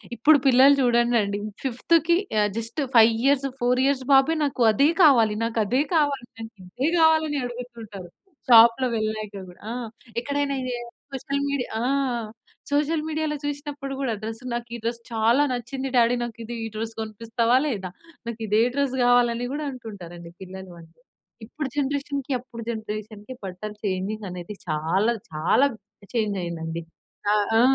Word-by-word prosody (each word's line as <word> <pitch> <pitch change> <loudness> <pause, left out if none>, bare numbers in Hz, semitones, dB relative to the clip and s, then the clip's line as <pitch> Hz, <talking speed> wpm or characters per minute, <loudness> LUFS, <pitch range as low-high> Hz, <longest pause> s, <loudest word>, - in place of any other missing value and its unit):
ఇప్పుడు 290 +6 +5
పిల్లలు 265 +2 +7
చూడండండి 235 -4 +2 0.2
ఫిఫ్త్‌కి, 325 +6 +2 0.4
జస్ట్ 230 +7 -3
5 230 0 +8
ఇయర్స్ 275 0 +3
4 245 +1 +2
ఇయర్స్ 275 -1 +1
బాబే, 270 +4 +5
"నాకు 275 -3 -2
అదే 280 +8 +4
కావాలి, 230 -8 +5
నాకు 230 0 -1
అదే 255 +7 +2
కావాలి 285 -5 +1 0.5
ఇదే 270 - -1
కావాలి" 320 0 +5
అని 295 -1 -1
అడుగుతుంటారు. 235 -7 -8 0.4
షాప్‌లో 235 +2 +7
వెళ్ళాక 215 -1 -3 0.2
కూడా. 175 - -16
ఆ! - - -3 0.5
ఎక్కడైనా 285 0 -1
ఇది 255 -1 -3 0.4
సోషల్ 280 +1 -2
మీడియా 280 -3 -2
ఆ! - - 0 0.9
సోషల్ 300 +2 +1
మీడియాలో 310 -1 -1
చూసినప్పుడు 285 -1 -5
కూడా, 255 -4 0
"డ్రెస్ 225 +2 -6
నాకు 240 0 -3
ఈ - - -4
డ్రెస్ 235 0 -2
చాలా 230 +5 +3
నచ్చింది 260 +2 -4
డాడీ 235 +1 +4
నాకు 230 -1 -7 0.3
ఈ - - -3
డ్రెస్ 225 +1 -4
కొనిపిస్తావా 230 +2 0
లేదా, 200 -9 -3 0.4
నాకు 230 -1 -5
ఇదే 215 +2 +3
డ్రెస్ 280 -2 0
కావాలి" 245 -1 +5
అని 245 +1 -3
కూడా 300 +1 -3
అంటుంటారండి 175 -8 -10
పిల్లలు 190 -1 -9
అంటే. 165 +6 -19 0.5
ఇప్పుడు 295 +5 -5
జనరేషన్‌కి 280 -1 -2
అప్పుడు 235 -1 -10
జనరేషన్‌కి 215 +1 -6
బట్టలు 195 +3 -6
చేంజింగ్ 200 +2 -2
అనేది 180 +3 -7
చాలా, 165 +9 +1 0.2
చాలా 160 - +3 0.5
చేంజ్ 215 -4 0
అయిందండి. 165 -1 -4 0.5
ఆహ్, 210 -1 +2
ఆ! - - +6
235 Hz, 145 wpm, -24 LUFS, 215-275 Hz, 0.9 s, 5